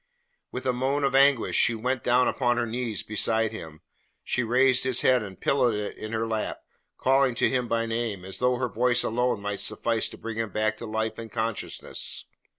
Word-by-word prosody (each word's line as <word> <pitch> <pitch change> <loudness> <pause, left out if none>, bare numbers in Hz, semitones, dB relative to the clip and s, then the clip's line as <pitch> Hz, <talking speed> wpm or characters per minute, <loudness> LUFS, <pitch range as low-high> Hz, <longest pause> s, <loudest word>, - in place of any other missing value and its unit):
With 125 - -6
a 130 - +2
moan 135 +3 0
of 135 -1 +1
anguish 135 -2 +4
she 120 - +4
went 125 +2 -2
down 125 +1 +3
upon 120 -2 +1
her 120 - +1
knees 115 -2 -3
beside 110 +1 +1
him. 80 -8 -9 0.4
She 125 - 0
raised 125 +2 +3
his 130 -1 +1
head 125 -1 +4
and 95 -3 -8
pillowed 125 -5 +2
it 105 0 -4
in 110 - -7
her 115 0 -1
lap, 110 -1 -2 0.4
calling 135 -1 +3
to - - +3
him 125 -2 0
by 115 0 0
name, 115 -5 -3
as 95 - -5
though 125 0 +2
her 125 0 -1
voice 125 +2 +2
alone 125 -2 0
must 100 -1 -2
suffice 115 -1 0
to - - -11
bring 115 -1 -6
him 115 -1 -1
back 110 +2 0
to 115 - -7
life 110 +1 -2
and 115 -1 -8
consciousness. 115 -1 -3
115 Hz, 205 wpm, -26 LUFS, 110-125 Hz, 0.4 s, anguish